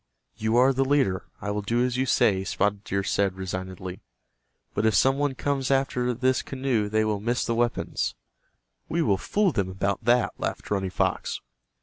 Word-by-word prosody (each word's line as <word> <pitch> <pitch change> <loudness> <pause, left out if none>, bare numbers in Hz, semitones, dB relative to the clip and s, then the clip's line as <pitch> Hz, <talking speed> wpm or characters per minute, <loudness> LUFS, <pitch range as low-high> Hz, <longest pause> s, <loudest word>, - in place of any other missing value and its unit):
"You 110 +1 0
are 130 +2 +5
the 135 +1 +2
leader, 130 -10 +1
I 105 - -2
will 105 0 -1
do 120 +4 +1
as 125 -1 -1
you 130 +1 0
say," 95 -5 +3
Spotted 100 +1 0
Deer 100 0 -1
said, 100 -1 +1
resignedly. 95 -1 -5 0.7
"But 110 +2 +1
if 110 - +2
some 135 +1 +4
one 145 -2 0
comes 135 -1 -1
after 135 -2 +1
this 130 +1 +2
canoe 130 -6 -1
they 110 +1 +2
will 105 -2 0
miss 120 +4 0
the 115 - 0
weapons." 120 0 -1 0.7
"We 170 0 +1
will 100 -7 +2
fool 205 - +1
them 100 -8 -1
about 100 +3 -2
that," 120 0 +3
laughed - - -4
Running 95 -2 0
Fox. - - -1
110 Hz, 185 wpm, -26 LUFS, 100-130 Hz, 0.7 s, are